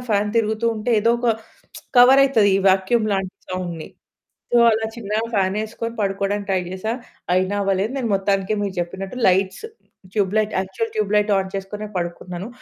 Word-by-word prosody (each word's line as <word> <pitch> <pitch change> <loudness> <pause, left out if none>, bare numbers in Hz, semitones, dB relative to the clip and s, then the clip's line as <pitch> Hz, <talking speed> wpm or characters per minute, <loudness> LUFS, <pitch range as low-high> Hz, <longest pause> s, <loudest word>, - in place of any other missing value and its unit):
Fan 210 0 +2
తిరుగుతూ 220 0 +1
ఉంటే 215 +3 -2
ఏదో 230 +2 +3
ఒక 240 -1 +2 0.7
కవర్ 255 +3 +8
అవుతది 225 -7 +3
ఈ - - +2
వాక్యూమ్ 205 +4 +2
లాంటి 190 -1 -2
సౌండ్‌ని. 175 -3 -5 0.6
సో, 240 - +5
అలా 220 0 0
చిన్నగా 215 0 -2
ఫానేసుకొని 215 +4 -1
పడుకోవడానికి 200 0 -1
ట్రై 190 -1 +2
జేసా. 190 +5 -3 0.4
అయినా 185 +2 +1
అవ్వలేదు. 195 +4 0
నేను 235 -4 -2
మొత్తానికి 195 0 0
మీరు 200 -2 -3
చెప్పినట్టు 190 +6 -5
lights, 190 - +1 0.5
tube 200 -2 0
light, 215 0 0
actual 195 +4 -4
tube 210 -1 0
light 210 0 +2
on 190 0 -3
చేసుకొనె 205 +2 -6
పడుకున్నాను. 175 +3 -5
200 Hz, 155 wpm, -21 LUFS, 190-220 Hz, 0.7 s, కవర్